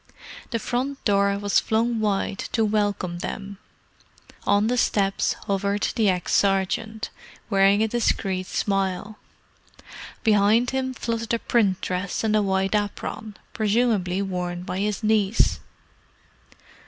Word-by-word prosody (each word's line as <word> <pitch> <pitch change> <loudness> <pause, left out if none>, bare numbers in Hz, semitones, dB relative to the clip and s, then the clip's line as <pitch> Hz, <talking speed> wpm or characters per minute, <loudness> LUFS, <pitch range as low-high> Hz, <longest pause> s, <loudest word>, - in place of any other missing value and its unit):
The 230 - -1
front 255 +4 -3
door 200 -1 +3
was 205 0 +2
flung 230 +1 0
wide 205 -2 -1
to 225 -2 +2
welcome 205 -4 -1
them: 200 +2 -6 0.9
on 205 +1 +4
the 245 +3 +1
steps 200 -5 +1
hovered 200 +1 0
the 215 -3 +3
ex 180 -2 -1
sergeant, 200 +3 0 0.4
wearing 200 +1 +4
a - - +2
discreet 195 -5 -1
smile. 195 +1 -2 1.0
Behind 220 +2 +4
him 260 0 -2
fluttered 230 -1 -2
a - - 0
print 210 -5 +1
dress 185 +3 -2
and 215 -1 +2
a 215 - +4
white 195 0 0
apron, 210 0 -3 0.2
presumably 210 -4 +1
worn 180 -2 -3
by 185 +1 -4
his 210 +1 -2
niece. 215 -1 +2
205 Hz, 125 wpm, -24 LUFS, 195-220 Hz, 1.0 s, on